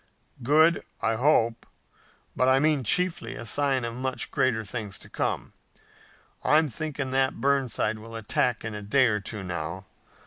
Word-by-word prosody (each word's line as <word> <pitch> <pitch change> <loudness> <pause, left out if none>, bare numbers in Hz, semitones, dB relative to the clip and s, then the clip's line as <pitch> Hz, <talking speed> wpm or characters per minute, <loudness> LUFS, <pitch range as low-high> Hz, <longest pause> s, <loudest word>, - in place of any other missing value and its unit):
"Good, 155 +6 +4 0.2
I 115 - +1
hope, 115 -2 +2 0.7
but 130 - +2
I 130 0 +5
meant 145 -4 +1
chiefly 180 - +1
a - - -7
sign 135 +1 +1
of 115 - -4
much 130 +1 -3
greater 110 -4 +1
things 105 0 -5
to - - -15
come. - - -2 0.9
I'm 155 +1 +4
thinking 140 0 -4
that 130 0 +1
Burnside 130 -6 +1
will 115 +1 -10
attack 115 +2 0
in 110 - -4
a 105 - -6
day 130 +6 +3
or 105 -3 +1
two 105 0 -6
now. 90 +1 -5
125 Hz, 160 wpm, -26 LUFS, 110-140 Hz, 0.9 s, I